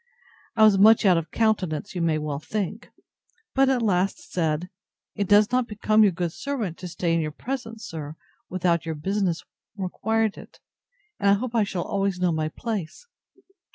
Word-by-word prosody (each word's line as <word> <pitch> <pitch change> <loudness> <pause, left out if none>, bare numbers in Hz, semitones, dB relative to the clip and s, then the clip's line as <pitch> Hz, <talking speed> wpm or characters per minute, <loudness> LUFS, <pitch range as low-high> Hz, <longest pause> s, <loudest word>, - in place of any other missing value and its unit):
I 220 - +5
was 210 -3 +6
much 220 +2 +6
out 180 -3 +5
of 165 -1 -8
countenance, 205 -5 0
you 180 - -3
may 165 -2 +2
well 150 -2 -3
think; 200 +4 -4 0.6
but 270 0 +4
said, 265 - +3
at 245 - -1
last, 200 - -1 0.8
It 200 - -2
does 210 +3 +5
not 250 -1 +1
become 215 +1 +2
your 205 -2 +6
good 175 -1 -2
servant 225 - -4
to 180 - -6
stay 175 0 -1
in 165 - +2
your 155 - -2
presence, 225 - -6
sir, 155 -2 -7 0.3
without 175 -2 +1
your 160 -1 -4
business 185 +2 -1 0.3
required 220 +3 -1
it; - - -15 0.6
and 200 -2 +3
I - - +7
hope 230 +4 -2
I 225 -2 +3
shall 190 -3 -3
always 195 -2 -1
know 180 -1 +2
my 155 -1 -1
place. 210 - -5
195 Hz, 180 wpm, -25 LUFS, 170-220 Hz, 0.8 s, I